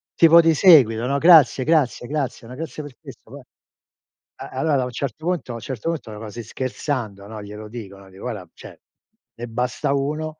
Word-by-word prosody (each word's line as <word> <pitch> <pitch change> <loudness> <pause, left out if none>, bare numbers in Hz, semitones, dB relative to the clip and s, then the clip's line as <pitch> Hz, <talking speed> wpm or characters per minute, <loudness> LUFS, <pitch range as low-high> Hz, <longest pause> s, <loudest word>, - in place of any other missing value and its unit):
tipo 165 0 +7
di 165 -1 +3
seguito, 130 - +5
no: 140 +1 0
"Grazie, 155 -4 +6
grazie, 150 -6 +1
grazie, 140 -5 -4
ma 125 - -9
grazie 155 0 -7
per 145 -3 -11
questo - - -14
no". - - -9 1.0
Eh, 70 - -9
allora 150 -5 0
a - - -2
un 125 - -6
certo 140 +5 -5
punto 175 -7 -2
a - - -6
un - - -6
certo 130 +4 -5
punto 155 -9 -5
ma 105 - -9
così 115 +2 -8
scherzando, 120 -4 -4
no, 110 0 -8
glielo 105 +1 -9
dico, 105 -4 -9
no, 95 0 -16
dico: 95 +1 -14
"Guarda, 105 -7 -6
cioè, - - -13 0.6
ne 120 +1 -7
basta 125 +4 -2
uno 155 +3 -3
130 Hz, 200 wpm, -22 LUFS, 110-155 Hz, 1.0 s, tipo